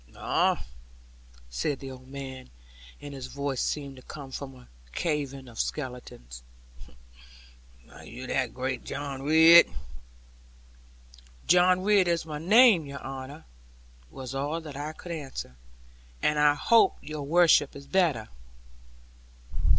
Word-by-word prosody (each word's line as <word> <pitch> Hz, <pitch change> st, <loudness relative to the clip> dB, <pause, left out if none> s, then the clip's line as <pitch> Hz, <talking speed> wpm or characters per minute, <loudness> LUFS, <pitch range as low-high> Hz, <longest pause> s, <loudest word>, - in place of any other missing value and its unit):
'Ah,' -, -, 0 dB, 0.8 s
said -, -, -2 dB
the 135 Hz, -1 st, -8 dB
old 130 Hz, 0 st, -12 dB
man, 135 Hz, -, -8 dB, 0.5 s
and 145 Hz, -1 st, -9 dB
his 130 Hz, -2 st, -7 dB
voice 140 Hz, -1 st, -3 dB
seemed 140 Hz, -2 st, -3 dB
to 130 Hz, -, -13 dB
come 140 Hz, 0 st, -10 dB
from 135 Hz, 0 st, -7 dB
a 125 Hz, -1 st, -17 dB, 0.3 s
cavern 140 Hz, -, -3 dB
of 115 Hz, -2 st, -11 dB
skeletons; 125 Hz, -, -5 dB, 1.5 s
'are -, -, -14 dB
you 130 Hz, -, -9 dB
that 130 Hz, -2 st, -1 dB
great 130 Hz, -1 st, -4 dB
John 140 Hz, -1 st, -5 dB
Ridd?' 160 Hz, +4 st, +7 dB, 1.8 s
'John 180 Hz, +1 st, +4 dB
Ridd 200 Hz, -2 st, +4 dB
is 170 Hz, -1 st, 0 dB
my 150 Hz, -2 st, -6 dB
name, 205 Hz, -, +5 dB
your 140 Hz, -1 st, -8 dB
honour,' 135 Hz, +3 st, -8 dB, 0.6 s
was 130 Hz, -, -8 dB
all 145 Hz, +4 st, -2 dB
that 150 Hz, -3 st, -9 dB
I 150 Hz, +2 st, -5 dB
could 175 Hz, +2 st, -10 dB
answer; 135 Hz, -, -6 dB, 0.7 s
'and 150 Hz, 0 st, +2 dB
I 150 Hz, 0 st, +5 dB
hope 230 Hz, +9 st, +4 dB
your 155 Hz, 0 st, -6 dB
worship 155 Hz, -1 st, +4 dB
is 140 Hz, 0 st, -10 dB
better.' 155 Hz, -, +1 dB
140 Hz, 125 wpm, -27 LUFS, 130-160 Hz, 1.8 s, Ridd